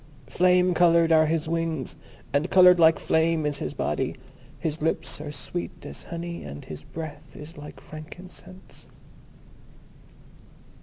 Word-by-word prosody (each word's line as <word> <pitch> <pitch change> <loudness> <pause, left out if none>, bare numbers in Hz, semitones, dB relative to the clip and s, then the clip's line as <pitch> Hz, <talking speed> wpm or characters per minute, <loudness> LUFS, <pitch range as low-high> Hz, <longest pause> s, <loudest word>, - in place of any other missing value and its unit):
Flame 180 +6 +3
coloured 170 -1 +4
are 155 -1 +5
his 160 0 -1
wings, 165 -4 -2 0.4
and 145 +5 +1
coloured 180 -1 +7
like 160 -1 +6
flame 160 -1 +1
is 145 -1 -1
his 75 - -4
body. - - -1 0.4
His 155 0 -3
lips 160 -1 -1
are 150 -1 -6
sweet 150 +5 -6
as - - -8
honey, 170 0 -6
and 70 0 -8
his 75 -1 -8
breath 155 -2 -9
is 155 +4 -10
like 150 -1 -10
frankincense." 180 +4 -12
160 Hz, 135 wpm, -26 LUFS, 150-175 Hz, 0.4 s, coloured